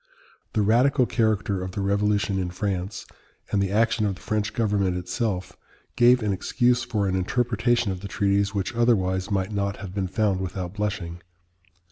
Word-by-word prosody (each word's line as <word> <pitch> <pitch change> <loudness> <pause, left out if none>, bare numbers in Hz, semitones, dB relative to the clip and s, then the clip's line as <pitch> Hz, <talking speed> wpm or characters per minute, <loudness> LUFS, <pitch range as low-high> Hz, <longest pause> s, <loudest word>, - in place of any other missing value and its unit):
The 110 - +2
radical 125 +5 +4
character 110 -5 0
of 90 0 -5
the 100 - -3
Revolution 100 0 +1
in 90 -1 -2
France, 95 +1 -3 0.5
and 100 - +2
the 100 - 0
action 110 +1 +2
of 100 - -2
the - - -16
French 110 0 -1
government 100 -5 +1
itself, 95 +1 -3 0.4
gave 120 0 +5
an 105 -2 +1
excuse 125 +5 +1
for 105 -5 -1
an 95 - 0
interpretation 120 +3 +1
of 95 - -4
the 100 - -7
treaties 100 -2 +1
which 100 +2 -1
otherwise 95 -5 +1
might 95 -1 -1
not 100 -1 -1
have 95 -2 -8
been 95 -2 -1
found 100 0 0
without 90 -1 -4
blushing. 100 -5 -3
100 Hz, 170 wpm, -25 LUFS, 95-110 Hz, 0.5 s, gave